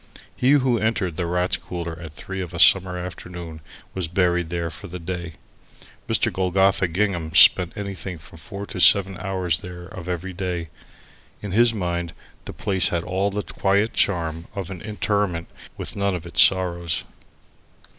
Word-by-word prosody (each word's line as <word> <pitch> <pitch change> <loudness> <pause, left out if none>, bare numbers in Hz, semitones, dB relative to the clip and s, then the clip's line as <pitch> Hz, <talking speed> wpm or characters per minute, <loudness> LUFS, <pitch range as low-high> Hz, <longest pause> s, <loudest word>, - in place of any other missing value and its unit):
He 130 +3 +3
who 130 -5 +3
entered 105 -6 0
the 85 0 -2
Rats' 90 +1 +1
Cooler 85 -2 -5
at 80 -3 -9
three 95 +6 -6
of 90 -1 -6
a - - -4
summer 90 0 +6
afternoon 90 -2 -7 0.3
was 95 -3 -2
buried 90 -1 +1
there 85 -1 -2
for 75 - -9
the 90 - -7
day. 85 -1 -5 0.7
Mr. - - +1
Golgotha 95 0 +2
Gingham 85 -3 -1
spent 85 +5 +6
anything 100 -3 -5
from 80 0 -14
four 100 +4 -7
to 100 - -7
seven 95 +1 +5
hours 95 -2 -1
there 90 -1 -9
of 90 -1 -9
every 90 +2 -3
day. 90 -3 -3 0.7
In 100 - -4
his 120 +4 +5
mind 85 -5 -3 0.3
the - - -6
place 95 -2 +1
had 85 -1 -1
all 95 +2 0
the 105 +1 -3
quiet 100 +3 +1
charm 85 -3 0
of 95 -2 -5
an 90 -3 -7
interment, 105 -5 -1 0.3
with - - -5
none 100 -1 0
of 90 -1 -6
its 85 - +3
sorrows. 85 -4 +2
90 Hz, 165 wpm, -23 LUFS, 85-95 Hz, 0.7 s, summer